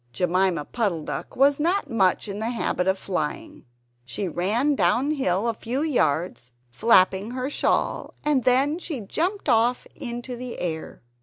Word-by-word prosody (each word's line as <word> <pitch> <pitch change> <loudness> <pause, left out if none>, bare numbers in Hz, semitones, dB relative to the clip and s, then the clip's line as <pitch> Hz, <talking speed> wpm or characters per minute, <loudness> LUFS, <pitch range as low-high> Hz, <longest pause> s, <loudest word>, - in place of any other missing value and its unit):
Jemima 180 0 +1
Puddle 200 -10 -1
duck - - -6
was 280 +2 +4
not 350 +6 +1
much 195 -2 +2
in 200 0 -5
the 220 +1 -2
habit 215 -6 -1
of 190 0 +2
flying. 180 -6 -4 0.4
She 125 +11 -4
ran 210 - +1
downhill 255 -8 +1
a 230 - +1
few 245 +6 -3
yards 160 - 0 0.2
flapping 190 - +3
her 255 +3 -3
shawl, - - 0
and 290 -4 +2
then 270 +5 +3
she 310 -8 -5
jumped 355 - -2
off 240 0 +2
into 240 0 -6
the 245 0 -7
air. 160 -7 -5
230 Hz, 150 wpm, -24 LUFS, 185-265 Hz, 0.4 s, was